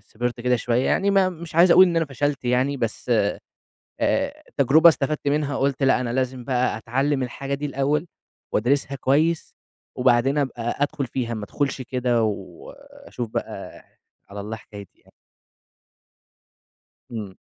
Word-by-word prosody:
صِبرت 120 +3 -4
كده 125 0 +2
شوية 120 +2 0
يعني 200 +1 +2
ما 195 -2 +4
مش 170 -2 -9
عايز 170 +2 +6
أقول 185 +2 +8
إن 170 -2 -1
أنا 165 - +3
فشَلت 140 0 -2
يعني 125 +3 +1
بس - - -4
آآ - - +3 1.2
التجربة 150 +5 +5
استفدت 145 -2 0
منها 145 -1 0
قُلت 140 0 0
لأ، 135 -1 +4
أنا 120 -2 -2
لازم 130 -1 -2
بقى 125 -4 0
أتعلّم 135 +5 0
الحاجة 135 +2 -4
دي 145 +1 -3
الأول، 145 +3 0 0.5
وأدرسِها 140 +4 +1
كويس، 150 +6 +1 0.4
وبعدين 125 +3 +3
أبقى 120 -4 -2
أدخُل 145 -2 -1
فيها، 120 -2 -3
ما 105 - -5
أدخُلش 135 +3 -2
كده 125 -1 0
وأشوف 105 +3 -6
بقى - - -6 0.4
على 100 +1 -7
الله 110 +2 -5
حكايتي 100 -3 -13
يعني. - - -25 2.0
إمم. 105 -5 -6
130 Hz, 145 wpm, -23 LUFS, 120-145 Hz, 2.0 s, أقول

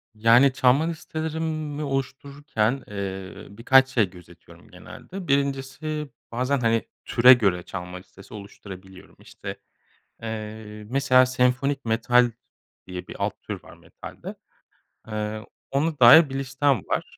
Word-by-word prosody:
Yani, 120 +5 +5
çalma 130 +3 +3
listelerimi 160 -2 -4
oluştururken, 135 -2 -2
eee, 95 -2 -6
birkaç 130 +6 +4
şey 115 -7 +1
gözetiyorum 85 -1 -17
genelde: 190 -1 -10
1'incisi 140 +2 -2 0.2
bazen, 130 +3 0
hani, 115 -1 +1 0.2
türe 125 +2 +7
göre 95 -8 +1
çalma 90 -1 -7
listesi 95 +2 -15
oluşturabiliyorum. 95 -2 -12
İşte, - - -9 0.6
eee, 110 -1 -7
mesela 130 -1 +4
"senfonik 130 +2 0
metal" 120 +2 +3 0.6
diye 90 -1 -7
bir - - -9
alt - - -3
tür - - -7
var - - -15
metalde. - - -11 1.4
Ona 150 +2 -1
dair 130 +6 +8
bir 135 - -6
listem 135 -3 0
var. - - -3
125 Hz, 115 wpm, -24 LUFS, 105-140 Hz, 1.4 s, dair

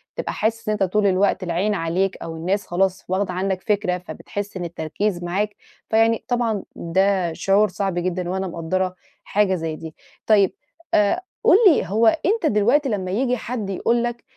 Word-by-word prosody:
تبقى - - -3
حاسس 225 0 -1
إن 215 - +2
أنتَ 210 - 0
طول 200 +2 +2
الوقت 190 0 +2
العين 185 +4 0
عليك، 185 +2 0
أو 165 - -6
الناس 185 +5 -2
خلاص 190 +1 0
واخدة 185 0 0
عنّك 185 0 -1
فكرة، 205 -5 0
فبتحس 200 +2 -7
إن 175 - -4
التركيز 175 +3 -3
معاك. 200 +4 -1 0.3
فيعني 225 0 +2
طبعًا 235 -4 0
ده 185 0 +1
شعور 200 +5 +3
صعب 195 0 -2
جدًا 180 0 -2
وأنا 190 +1 -2
مقدّرة 180 +2 -2 0.3
حاجة 200 -2 +1
زي 160 -2 -3
دي. 160 0 -9 0.3
طيب 200 -4 +4 0.4
أ 205 -1 +4 0.3
قُل - - +7
لي، 325 - +4
هو 220 +4 +3
أنتَ 345 - +2
دلوقتي 255 +4 +3
لمّا 190 -4 -2
ييجي 250 +4 +1
حد 220 -4 -4
يقول 235 +5 +1
لك 240 0 -3
195 Hz, 170 wpm, -22 LUFS, 180-215 Hz, 0.4 s, قُل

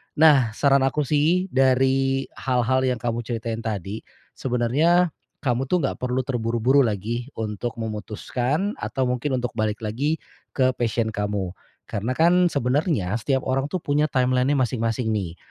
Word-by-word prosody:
Nah, 145 -7 +5
saran 140 +1 +4
aku 140 +3 0
sih, 160 +7 +2
dari 135 +1 +2 0.2
hal-hal 130 0 +1
yang 125 - +1
kamu 120 -1 -1
ceritain 115 -1 -3
tadi, 105 -1 -3 0.4
sebenarnya, 145 +9 +2 0.3
kamu 125 -1 0
tuh 180 - +2
nggak 135 - -1
perlu 125 +1 0
terburu-buru 120 +1 +1
lagi, 115 +3 -2
untuk 110 +2 -4
memutuskan, 120 - -2
atau 135 - -2
mungkin 130 +2 -1
untuk 125 - -2
balik 110 0 -1
lagi, 135 +9 0 0.4
ke 130 -2 +3
passion 115 -2 -1
kamu. 105 -3 -2 0.3
Karena 110 +5 -3
kan, 175 +3 +4
sebenarnya, 140 - 0
setiap 130 +3 0
orang 135 +1 0
tuh 180 +2 -4
punya 145 +1 +2
timeline-nya 130 +1 +2
masing-masing 115 -3 0
nih. 95 -6 -2
125 Hz, 145 wpm, -24 LUFS, 115-140 Hz, 0.4 s, Nah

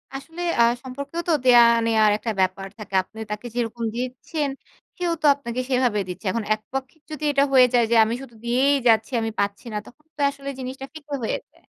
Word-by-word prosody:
আসলে 325 +5 -8 0.2
আ - - +8 0.2
সম্পর্কেও 280 +5 -5
তো - - +4
দেওয়া 240 -1 +8 0.2
নেওয়ার 220 -2 +4
একটা 225 +1 -3
ব্যাপার 190 +1 -1
থাকে। 210 -3 -10
আপনি 220 - -14
তাকে 210 +3 -5
যেরকম 235 -1 -2
দিচ্ছেন, 255 +4 -3 0.5
সেও 350 -1 0
তো - - -1
আপনাকে 255 -2 -4
সেভাবে 250 -5 +2
দিচ্ছে। 185 +3 -8
এখন 230 -2 -2
এক 215 - -5
পক্ষে 270 +3 -4
যদি 305 0 -6
এটা 280 0 +3
হয়ে 255 -1 +7
যায় 240 - +5
যে - - +4
আমি 225 - -2
শুধু 250 -4 -12
দিয়েই 260 +4 +3
যাচ্ছি 220 +3 +3
আমি 225 0 -2
পাচ্ছি 200 +1 -2
না, - - -1
তখন 300 +5 -18
তো - - -23
আসলে 280 0 -8
জিনিসটা 260 +1 -6
ফিকে 295 -2 -10
হয়ে - - -1
যায়। - - -27
250 Hz, 205 wpm, -23 LUFS, 225-280 Hz, 0.5 s, আ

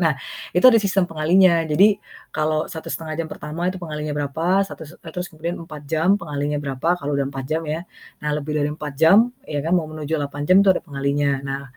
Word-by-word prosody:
nah 165 -5 +2 0.4
itu 180 - +2
ada 230 -3 +8
sistem 195 -2 +2
pengalinya. 170 +2 +4
Jadi 195 +7 +4 0.3
kalau 155 0 0
1,5 160 -2 -5
jam 165 - -4
pertama 160 +5 -4
itu 185 - -3
pengalinya 150 -3 -4
berapa, 165 +7 +1
satu 195 - -10
s - - -13
e 165 - -13
terus 180 +1 -4
kemudian 165 +3 -4
4 155 -3 -9
jam 165 +6 +3
pengalinya 150 -2 -2
berapa, 145 +5 0
kalau 145 +1 -3
udah 140 -1 0
4 135 -1 -6
jam 160 +1 0
ya. 155 +2 -2 0.4
Nah 150 - 0
lebih 150 0 -4
dari - - 0
4 150 -1 -6
jam 160 +6 +6 0.3
ya 145 - -3
kan, 165 - -1
mau 170 - 0
menuju 155 -1 -6
8 145 -1 -4
jam 185 +1 +7
tuh 195 - +6
ada - - -2
pengalinya. 140 -1 0
Nah 135 0 -3
155 Hz, 215 wpm, -22 LUFS, 145-175 Hz, 0.4 s, ada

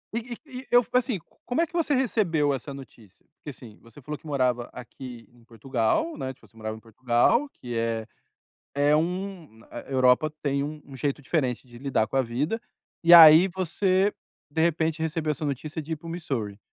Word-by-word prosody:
E - - +1 0.3
e 255 -3 -8
e - - -20
eu, 245 -1 +5
assim, 250 -4 +1 0.3
como 250 +7 0
é - - +3
que 350 - -26
você 325 -4 +1
recebeu 175 - +1
essa 135 +2 -5
notícia? 115 -7 -14
Porque 150 - -10
assim, 120 -5 -12
você 115 +5 -16
falou 150 +4 -5
que 160 - -15
morava 125 -4 0
aqui 125 -1 -10
em 120 -1 -22
Portugal, 120 - -1
né, 130 - -4
tipo, - - -22
você 115 - -33
morava 110 0 -5
em - - -12
Portugal, 120 - +1
que 120 - -8
é 115 -1 -1 0.7
é 145 +1 +4
um 175 - -3
a - - -7
Europa 130 +3 +3
tem 140 -1 0
um 145 -2 -7
jeito 140 +1 -2
diferente 130 -4 -1
de 120 -1 -13
lidar 130 -5 0
com 135 - -4
a 135 - +4
vida, 145 - -2 0.4
e 170 +1 +8
aí 165 +2 +10
você, 190 +2 +1 0.4
de 160 - -2
repente, 160 -1 +1
recebeu 160 -1 -1
essa 150 +1 -3
notícia 150 +4 -4
de 160 +2 -6
ir - - -1
para 165 - -14
o - - -5
Missouri. 120 - -4
145 Hz, 195 wpm, -26 LUFS, 125-170 Hz, 0.7 s, aí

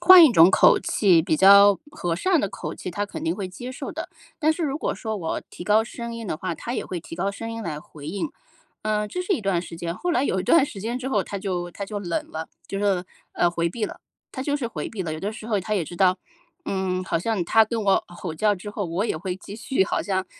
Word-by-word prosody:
换 355 -1 +10
一 280 - +5
种 165 -2 +8
口 - - +6
气， 180 -6 +4
比 160 -3 +1
较 200 +1 +8
和 170 - -2
善 355 - +2
的 200 - -1
口 - - -6
气 180 - -6
他 205 +3 -2
肯 - - -7
定 165 +2 +1
会 195 -2 -4
接 245 +8 -7
受 - - -6
的。 - - -5 0.3
但 310 +1 +4
是 335 - -4
如 280 -2 -1
果 315 - -2
说 220 -2 -4
我 165 -4 -3
提 - - -9
高 210 +3 +4
声 235 0 -6
音 230 -1 -6
的 155 - -2
话， 170 0 -3
他 240 +8 -5
也 - - -2
会 180 -2 -4
提 160 0 -9
高 195 +3 0
声 225 +3 -6
音 230 0 -5
来 150 -4 -4
回 150 -1 -12
应。 200 - -3 0.5
嗯， 210 -1 0
这 360 - -3
是 380 - 0
一 335 - 0
段 190 -4 0
时 170 - -9
间， 170 0 -4
后 355 - -2
来 280 -5 +2
有 190 -6 0
一 - - -2
段 290 - +5
时 195 - -8
间 235 +4 -2
之 260 +1 -4
后， 210 -7 +2
他 200 - -5
就 180 -3 -3
他 200 +3 -6
就 205 -1 -4
冷 175 -4 -3
了， 160 0 -5 0.2
就 195 0 -4
是， 190 -3 +1 0.3
呃， 175 - +3
回 170 0 0
避 215 +5 -3
了， - - -7 0.3
他 260 - -4
就 285 +1 0
是 255 -5 -3
回 230 - -5
避 200 -4 -4
了。 160 -2 -3
有 155 - -5
的 200 +4 -2
时 220 0 -9
候 210 -4 +1
他 215 +4 -4
也 185 -6 +1
知 175 - -9
道， 185 +1 +3 0.5
嗯， 185 -1 -1
好 170 - 0
像 195 +1 -1
他 225 +6 +5
跟 225 +1 -2
我 195 - +4
吼 175 -2 -6
叫 205 +3 +2
之 205 +3 -8
后， 205 -1 -3
我 175 +5 -1
也 190 - -1
会 180 +3 -4
继 200 - -10
续 230 -2 +1
好 - - -1
像 190 -2 -1
200 Hz, 295 characters per minute, -24 LUFS, 175-225 Hz, 0.5 s, 换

